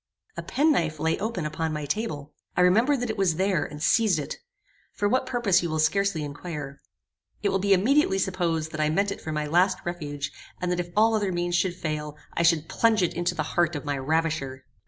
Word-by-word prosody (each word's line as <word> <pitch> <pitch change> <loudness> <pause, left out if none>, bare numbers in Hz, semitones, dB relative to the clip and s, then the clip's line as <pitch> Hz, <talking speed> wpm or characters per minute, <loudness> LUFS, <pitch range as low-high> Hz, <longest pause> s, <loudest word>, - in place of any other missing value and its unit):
A - - -4
penknife 175 - +1
lay 160 +1 0
open 200 -5 -2
upon 160 +1 -2
my 150 -1 -3
table. 150 -6 -3 0.2
I - - +4
remembered 230 +10 +4
that 245 -2 -1
it 215 - -6
was 180 -5 +2
there, 190 -1 +1
and 150 +1 -7
seized 215 -4 +3
it. 150 - -4 0.6
For 205 - 0
what 255 +4 +1
purpose 225 -8 +2
you 170 - -2
will 155 - -1
scarcely 165 +1 +1
inquire. 145 -1 -6 0.6
It 200 - +2
will 195 0 +1
be 200 +1 0
immediately 220 - +3
supposed 170 -4 -1
that 155 - -3
I 150 - +2
meant 200 +5 +1
it - - -6
for 160 - -5
my 150 0 -1
last 180 +5 +3
refuge, 145 -5 -4 0.3
and 180 -1 -1
that 180 - 0
if 175 0 -3
all 225 +1 +5
other 205 -3 +1
means 175 0 -1
should 175 0 +1
fail, 150 -3 -4 0.2
I - - 0
should 165 -2 +3
plunge 225 -4 +2
it 175 - 0
into 175 +1 -1
the 155 - -1
heart 175 -1 +2
of 145 - -5
my 145 -1 -1
ravisher. 140 -2 -1
175 Hz, 220 wpm, -26 LUFS, 155-200 Hz, 0.6 s, all